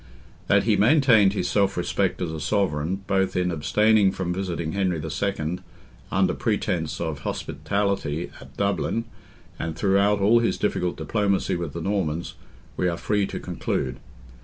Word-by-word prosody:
That - - +4
he - - +3
maintained 115 -5 +5
his 105 - -1
self 100 -2 +1
respect - - 0
as 85 - -2
a 80 - -5
sovereign, 90 +1 0
both 95 -1 +1
in 90 -1 +1
abstaining 105 +5 +3
from 90 -2 -2
visiting 90 -4 -3
Henry 95 -3 0
II. 80 +1 -2 0.5
under - - +2
pretence - - -1
of 80 -4 -3
hospitality 100 -1 -2
at - - -15
Dublin, 100 +3 0 0.5
and 80 -1 -3
throughout 100 +3 +3
all 105 +4 +5
his 115 - 0
difficult 90 -4 -1
diplomacy 100 -4 0
with 85 -4 -4
the 85 - -5
Normans, 85 -4 -1 0.4
we 90 - +1
are 85 -1 -1
free 105 0 0
to - - -5
conclude. 65 -1 -3
95 Hz, 150 wpm, -24 LUFS, 85-100 Hz, 0.5 s, maintained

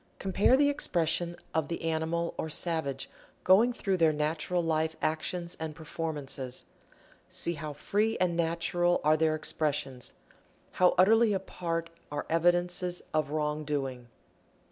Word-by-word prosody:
Compare 195 +6 +3
the 285 +1 +4
expression 175 - +1 0.2
of 160 -3 0
the 170 +1 -4
animal 165 +1 -1
or 160 - -3
savage 155 -4 -1 0.4
going 210 +7 +6
through 195 -5 -1
their 165 -2 +4
natural 155 +3 -1
life 160 0 0
actions 170 +2 -2
and 160 -1 -4
performances. 150 -5 -4 0.6
See 170 - +1
how 150 -1 -6
free 210 +9 0
and 180 -2 +1
natural 170 +1 +1
are 155 +1 +5
their 155 0 +2
expressions, 145 -5 -2 0.6
how 180 -1 +3
utterly 220 +4 +5
apart 170 -3 -3 0.2
are 145 0 -3
evidences 175 +1 +1
of 155 -2 +1
wrong 150 0 -1
doing. 135 -4 -3
165 Hz, 130 wpm, -30 LUFS, 155-175 Hz, 0.6 s, going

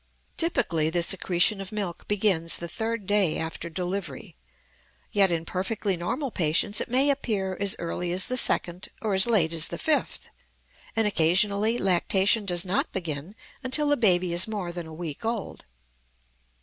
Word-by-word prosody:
Typically, 170 - +1
the 170 +1 +1
secretion 190 +3 +1
of 195 - -8
milk 200 -5 -5
begins 195 -5 +1
the 170 - -6
third 225 +4 -4
day 200 -5 +2
after 160 +1 -5
delivery; 175 -4 -5 0.8
yet 195 -2 +4
in 165 -1 -2
perfectly 195 +2 -2
normal 230 - -4
patients 175 +4 +1
it - - -4
may 265 +4 +4
appear 205 -9 -2
as 200 -1 +1
early 175 +1 -4
as 180 +1 +3
the 255 - -2
second 180 -6 +2
or 215 -3 -2
as 190 +4 +4
late 180 -8 +2
as 165 -1 -2
the - - -5
fifth, 310 -1 -1 0.7
and 225 -1 +4
occasionally 200 +5 +3
lactation 195 +2 +2
does 175 0 +2
not 185 +2 -1
begin 170 +1 -5 0.3
until 290 +3 +2
the 290 - +4
baby 185 -7 +3
is 175 +4 +3
more 205 -5 -4
than 170 -1 -7
a - - -11
week 160 0 -7
old. 225 -3 -4
190 Hz, 160 wpm, -25 LUFS, 170-215 Hz, 0.8 s, yet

